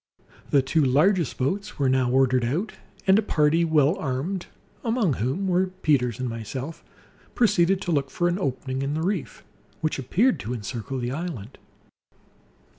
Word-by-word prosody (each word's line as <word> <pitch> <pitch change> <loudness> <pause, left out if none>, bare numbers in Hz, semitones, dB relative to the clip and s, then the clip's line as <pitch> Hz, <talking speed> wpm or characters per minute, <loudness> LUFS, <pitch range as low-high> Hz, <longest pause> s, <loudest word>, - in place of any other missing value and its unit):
The 140 -2 +4
two 155 +4 +2
largest 155 +5 +2
boats 195 +10 -2
were 140 -3 +1
now 130 -1 +2
ordered 130 -1 +3
out, 160 - -1 0.3
and 190 +2 +6
a - - +2
party, 160 -4 +2
well 155 0 +3
armed 155 +7 -3 0.4
(among 225 - +1
whom 130 - -1
were 185 +1 +2
Peters 145 - 0
and 130 - -2
myself), 125 +7 -6 0.5
proceeded 195 -4 +3
to 175 - -2
look 140 -4 +1
for 175 - 0
an 175 +2 0
opening 130 -4 -2
in 140 +2 -1
the 160 - -1
reef 190 -3 -3 0.4
which 155 -3 -1
appeared 180 - +2
to 115 +4 -4
encircle 120 +4 -5
the 120 -1 -2
island. 140 - -6
150 Hz, 160 wpm, -25 LUFS, 130-180 Hz, 0.5 s, and